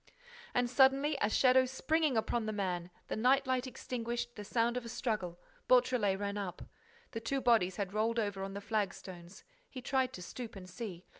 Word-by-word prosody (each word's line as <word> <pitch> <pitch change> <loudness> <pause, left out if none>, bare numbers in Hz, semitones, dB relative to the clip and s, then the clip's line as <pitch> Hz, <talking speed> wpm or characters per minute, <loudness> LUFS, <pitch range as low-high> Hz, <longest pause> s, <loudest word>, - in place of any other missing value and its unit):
And, 245 0 +3
suddenly, 270 +4 +4
a 205 - +3
shadow 255 +2 +5
springing 300 +1 +1
upon 220 0 0
the - - 0
man, 180 -4 -2 0.2
the - - -2
night 265 +5 +3
light 260 0 0
extinguished, 240 -1 -4
the 210 - -6
sound 230 +3 +1
of 250 - -2
a 230 - -7
struggle—Beautrelet 215 +1 +1
ran 205 0 -2
up. 190 -3 -5 0.5
The 225 - -3
two 270 +4 -1
bodies 225 -8 +3
had 195 -1 -3
rolled 225 +2 +1
over 205 -3 -1
on 195 0 -5
the 200 - -4
flagstones. 190 -4 -4 0.3
He 255 - -7
tried 260 -1 +1
to 180 - -7
stoop 235 +5 -7
and 185 -2 -9
see. 185 -1 -7
230 Hz, 180 wpm, -33 LUFS, 200-255 Hz, 0.5 s, shadow